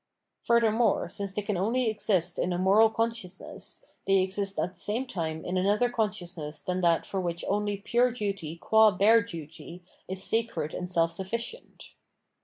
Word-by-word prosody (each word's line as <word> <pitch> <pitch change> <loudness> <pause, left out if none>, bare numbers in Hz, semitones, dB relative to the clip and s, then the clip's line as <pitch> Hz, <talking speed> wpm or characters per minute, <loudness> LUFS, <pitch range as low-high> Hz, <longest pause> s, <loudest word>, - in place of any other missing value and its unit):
Furthermore, 230 -3 +3
since 200 +2 -5
they 205 +2 -3
can 205 -2 -1
only 230 +6 +1
exist 190 -5 0
in 180 - 0
a 175 - 0
moral 200 +5 +5
consciousness, 225 - -4 0.2
they 195 0 +5
exist 195 +1 -1
at 180 - -1
the - - -10
same 230 +5 -1
time 160 -9 -4
in 180 +1 -1
another 210 +6 +2
consciousness 175 -9 -3
than 180 0 -2
that 170 -2 +3
for 195 - -3
which 170 -1 -3
only 205 0 0
pure 240 +5 +2
duty 200 -9 -4
qua 220 +5 +5
bare 210 +4 +5
duty 170 -1 -9 0.2
is 190 +1 -5
sacred 225 -9 -1
and 180 - -4
self 165 -2 +2
sufl5cient. 230 - -6
195 Hz, 165 wpm, -28 LUFS, 180-220 Hz, 0.2 s, moral